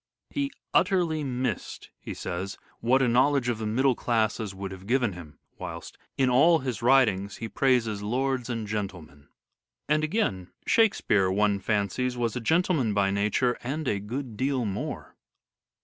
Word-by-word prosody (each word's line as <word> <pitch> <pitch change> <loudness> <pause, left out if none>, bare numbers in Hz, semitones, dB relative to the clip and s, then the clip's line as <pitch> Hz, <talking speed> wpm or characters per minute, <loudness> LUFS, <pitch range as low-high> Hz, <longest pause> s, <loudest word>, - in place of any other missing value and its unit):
" - - -62
He 280 -1 -1 0.2
utterly 170 -6 +2
missed," 125 -4 -3
he - - -7
says, 95 +3 -4
" - - -33
what 130 +3 +3
a - - +3
knowledge 130 +1 +3
of 115 -2 -1
the 110 - -2
middle 130 +5 +3
classes 110 -4 -1
would 95 0 -5
have 95 0 -10
given 120 -4 +1
him," 85 -4 -11 0.2
whilst - - -7 0.2
"in 135 - +3
all 145 +7 +5
his 130 -7 -4
writings 115 -6 +3
he 115 - -5
praises 115 -5 +1
lords 130 +3 -1
and 115 -2 -3
gentlemen." 90 -9 -6 0.6
And 150 +1 +2
again, 155 - -1
" - - -41
Shakespeare, 150 - +3
one 100 +1 +2
fancies, 105 +5 -1
was 115 -2 -1
a 125 - -3
gentleman 160 - +2
by 100 -1 +2
nature, 105 +5 +1
and 145 +6 -3
a 100 - +1
good 115 +2 -5
deal 130 0 0
more." 100 -1 -5
120 Hz, 165 wpm, -27 LUFS, 100-135 Hz, 0.6 s, all